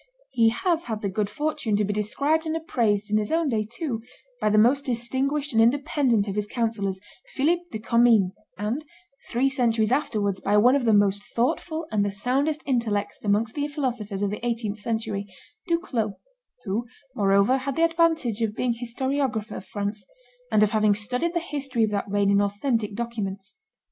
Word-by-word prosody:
He 225 -2 +4
has 340 - 0
had 220 -3 -4
the 200 - 0
good 205 +1 -1
fortune 290 -3 -1
to 210 0 +2
be 205 - -1
described 285 +10 0
and 315 +1 0
appraised, 215 -9 0
in 210 - +4
his 210 - -3
own 325 -2 +2
day 220 -4 +1
too, 235 +2 -4 0.4
by - - +2
the 210 - +3
most 250 +6 +4
distinguished 265 +4 -1
and 225 - +5
independent 250 -3 +2
of 195 - -2
his 210 0 -2
councillors, 210 -5 -1 0.4
Philip 330 +6 +2
de 220 - -4
Commynes, 225 -3 +4 0.3
and, 220 +9 -2 0.5
three 250 +3 +2
centuries 235 -5 +1
afterwards, 210 -8 0
by 205 +1 +2
one 245 +6 +6
of 275 -3 0
the 225 - +4
most 205 -1 +3
thoughtful 315 +6 0
and 210 -2 +2
the 205 - 0
soundest 265 +10 -1
intellects 225 -6 -1
amongst 215 +2 +1
the 290 -1 -1
philosophers 240 -9 -3
of 200 - 0
the 210 - -6
eighteenth 225 -3 -2
century, 220 -2 -3 0.4
Duclos, 255 - 0 0.5
who, 220 +4 -2 0.3
moreover, 200 +4 +3
had 270 0 -3
the 330 - +2
advantage 325 -9 +1
of 215 -2 0
being 245 -1 0
historiographer 245 -1 -2
of 190 - -9
France, 205 +1 -4 0.5
and 215 -1 +5
of 210 - +2
having 215 -2 +3
studied 250 - -1
the - - +3
history 275 -7 -2
of 215 - +1
that 200 0 -2
reign 200 0 +2
in 200 0 +4
authentic 205 +1 -1
documents. 205 -4 -4
230 Hz, 180 wpm, -25 LUFS, 205-270 Hz, 0.5 s, one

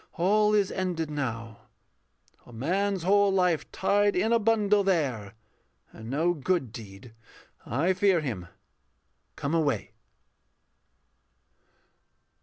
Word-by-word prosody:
All 210 +4 +3
is 205 -2 +2
ended 175 -5 -3
now; 115 -6 -5 0.8
A - - -13
man's 185 - -1
whole 200 +2 +4
life 180 -4 +1
tied 205 +1 +1
in 220 +5 +1
a 230 - +4
bundle 210 -2 +2
there, 130 - -1 0.6
And 110 +1 -10
no 160 +6 +1
good 160 -4 -1
deed. 110 +1 -11 0.5
I 160 - +1
fear 185 -1 +3
him. 110 - -5 0.9
Come 140 +2 -3
away. 155 -4 0
175 Hz, 105 wpm, -27 LUFS, 130-200 Hz, 0.9 s, whole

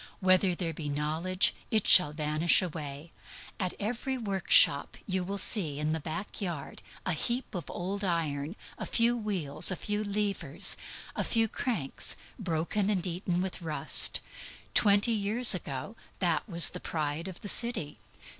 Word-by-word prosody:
"Whether 185 -1 +3
there 170 -2 -2
be 150 -1 -6
knowledge, 160 +6 +1 0.2
it 215 -3 +1
shall 180 -5 +7
vanish 155 +4 +2
away." 155 -2 -7 0.5
At 185 -2 -2
every 245 +5 -3
workshop 195 - +3
you 185 -2 -2
will 200 +3 -5
see, 175 -9 0
in 150 +1 -2
the 160 - -2
back 165 +8 -6
yard, 170 -7 -6 0.2
a - - 0
heap 240 +11 -2
of 175 -5 -6
old 195 +3 -5
iron, 165 -3 -2 0.2
a - - -5
few 235 +1 +3
wheels, 195 -11 +2
a 185 - 0
few 210 +3 -2
levers, 205 -1 -1 0.4
a - - -1
few 225 -1 +1
cranks, 215 - -1 0.2
broken 190 +2 -2
and 190 -4 -1
eaten 180 0 -2
with 190 -1 -5
rust. 160 -3 +3 0.5
Twenty 205 +2 +5
years 215 +3 +3
ago 150 - -5 0.2
that 175 +3 -1
was 170 -2 +7
the - - -8
pride 155 +2 -4
of 185 -2 -10
the - - -7
city. 215 - -1
185 Hz, 155 wpm, -29 LUFS, 160-205 Hz, 0.5 s, shall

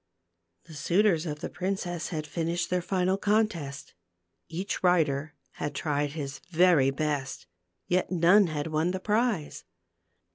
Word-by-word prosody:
The 160 - -14
suitors 175 +2 +2
of 150 -1 -5
the - - -4
princess 180 -3 -3
had 155 -2 -3
finished 170 +2 -2
their 180 0 +1
final 185 +1 0
contest; 170 -10 -1 0.6
each 180 +5 -3
rider 155 -5 +2 0.2
had 145 -1 -5
tried 145 -1 -1
his 140 -3 -5
very 170 -5 +4
best, 140 -1 -2 0.4
yet 180 +1 0
none 185 +3 +5
had 150 -2 -3
won 160 +2 0
the 190 +1 -2
prize. 210 -5 0
165 Hz, 135 wpm, -28 LUFS, 150-185 Hz, 0.6 s, none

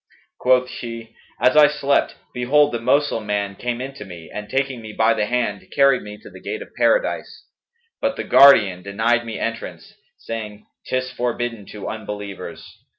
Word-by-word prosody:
Quoth 125 0 +3
she, 115 -2 -8 0.2
'As 125 - +3
I 150 -1 +8
slept, 145 -1 +1 0.2
behold 145 +4 +3
the 120 - -2
Moslem 125 -2 +1
man 100 -1 -1
came 120 +3 -3
in 135 +2 -5
to 135 - -9
me 85 -4 -11
and 105 0 -6
taking 135 -2 -1
me 110 -1 -9
by 110 +1 +3
the 105 - -1
hand, 115 -4 -2
carried 140 -2 +4
me 105 0 -9
to - - -11
the - - -13
gate - - -5
of - - -20
Paradise; - - 0 0.6
but 280 -1 0
the - - -4
Guardian 105 -10 +6
denied 115 +5 0
me 110 - -4
entrance, - - -5 0.2
saying, 105 -2 -7 0.2
'Tis 130 0 -1
forbidden 120 -4 -3
to 105 -2 -8
unbelievers.' 105 -3 -7
115 Hz, 170 wpm, -21 LUFS, 105-130 Hz, 0.6 s, I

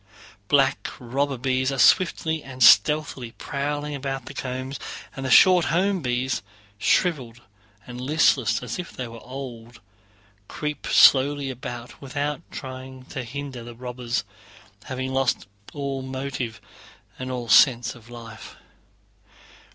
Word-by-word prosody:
Black - - +3
robber 135 +3 -2
bees 130 +1 0
are 135 - -3
swiftly 160 +1 +3
and 130 -1 -2
stealthily 140 -3 +5
prowling 145 +1 -3
about 135 -2 -4
the - - -8
combs, 130 0 -5 0.4
and 135 - -5
the 130 - -2
short 180 +5 +7
home 185 +3 +1
bees, 125 0 -1 0.4
shriveled 120 - +1 0.4
and 125 0 -8
listless 130 -5 +2
as 120 +4 -5
if 175 - -6
they 125 -2 -6
were 115 -1 -10
old, 120 -3 -9 0.7
creep 150 -2 -5
slowly 140 0 +5
about 120 -1 -8
without 145 +2 -3
trying 130 -1 -8
to 130 -3 -3
hinder 130 0 -6
the 120 0 -10
robbers, 125 -2 -3 0.6
having 130 0 -4
lost 135 -1 +1 0.3
all 140 -2 -3
motive 130 -4 -4 0.6
and 130 0 -4
all 125 -2 -4
sense 120 +2 +5
of 120 -1 -16
life. 115 -2 -10
130 Hz, 130 wpm, -24 LUFS, 120-140 Hz, 0.7 s, short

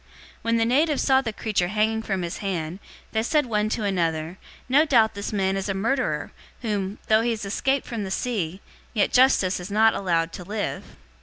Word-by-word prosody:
028:004 - - -30 0.3
When 230 0 +1
the 225 - +2
natives 290 +5 +2
saw 265 -1 +4
the 230 -4 -3
creature 210 -4 -1
hanging 215 +3 +1
from 195 -4 -2
his 170 0 -4
hand, 180 -3 -3 0.3
they 220 - +1
said 295 +5 +2
one 215 -2 0
to 220 0 -2
another, 170 -3 -1 0.3
"No 275 +4 +5
doubt 230 -8 +4
this 200 0 -5
man 195 -2 0
is 195 +1 -3
a 195 - -1
murderer, 245 +7 -1 0.3
whom, 205 -2 -2
though 220 0 +4
he 235 - 0
has 220 -3 -2
escaped 270 +7 0
from 230 -3 -4
the 195 - -4
sea, 190 -4 -2 0.3
yet 205 - +2
Justice 245 -8 +4
has 180 +2 -7
not 220 +2 +4
allowed 165 -3 0
to 180 - -7
live." 205 +3 -4
210 Hz, 205 wpm, -24 LUFS, 190-230 Hz, 0.3 s, No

